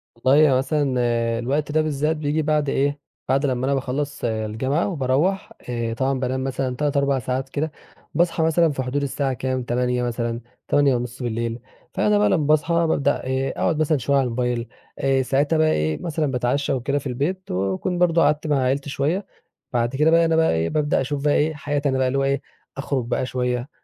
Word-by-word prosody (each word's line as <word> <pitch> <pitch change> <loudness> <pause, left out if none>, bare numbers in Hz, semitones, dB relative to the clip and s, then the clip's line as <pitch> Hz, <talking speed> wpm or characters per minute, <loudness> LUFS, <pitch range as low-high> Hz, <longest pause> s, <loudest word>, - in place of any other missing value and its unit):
والله 140 +5 +4
هو 130 - +4
مثلًا 145 +3 0 0.5
الوقت 140 +5 -1
ده 155 +1 +3
بالذات 155 +1 0
بييجي 150 +1 0
بعد 150 -1 +1
إيه 145 +1 0 0.3
بعد 135 +2 +2
لمّا 130 -2 0
أنا 140 - +1
باخلّص 140 +2 -3
الجامعة 115 +7 -1
وباروّح، 165 +3 0 0.2
آآ 115 -1 -2
طبعًا 130 +2 0
بانام 130 +1 -1
مثلًا 130 -1 -2
3، 145 +1 0
4 140 -1 +2
ساعات 130 +2 -3
كده، 150 +3 -2 0.4
باصحى 170 -1 +1
مثلًا 165 0 +3
في 135 -2 -3
حدود 135 +3 -2
الساعة 140 -1 -1
كام؟ 130 +1 -2
20:00 125 0 0
مثلًا، 120 -1 -2 0.3
20:30. 120 -4 0 0.3
فأنا 210 0 +2
بقى 210 - +3
لمّا 155 -6 +1
باصحى 155 +2 +2
بابدأ 160 -4 +1
إيه 130 +1 -1
أقعد 155 - +1
مثلًا 155 0 +2
شوية 140 +2 0
على 135 - +3
الموبايل 125 -1 -1 0.3
آآ 135 -1 +2
ساعتها 140 +5 +1
بقى 155 0 +3
إيه 75 0 0
مثلًا 155 -4 -1
باتعشى 125 +3 0
وكده 135 +2 -1
في 140 - -6
البيت 150 +10 -3
وأكون 95 - -1
برضه 170 -1 +3
قعدت 150 +1 +2
مع 145 -2 +2
عيلتي 135 +3 0
شوية 155 +8 -1 0.5
بعد 120 +1 0
كده 150 +3 +3
بقى 165 0 +5
أنا 165 0 +2
بقى 160 0 +3
إيه 80 0 0
بابدأ 150 - +1
أشوف 140 +1 -3
بقى 145 - +4
إيه 155 +2 +2
حياتي 145 -1 -1
أنا 130 - 0
بقى 130 -1 +2
اللي 130 +2 0
هو - - +1
إيه 140 +1 0 0.4
أخرج 135 -2 -2
بقى 120 +2 -1
شوية، 125 0 -2
140 Hz, 195 wpm, -22 LUFS, 125-150 Hz, 0.5 s, بقى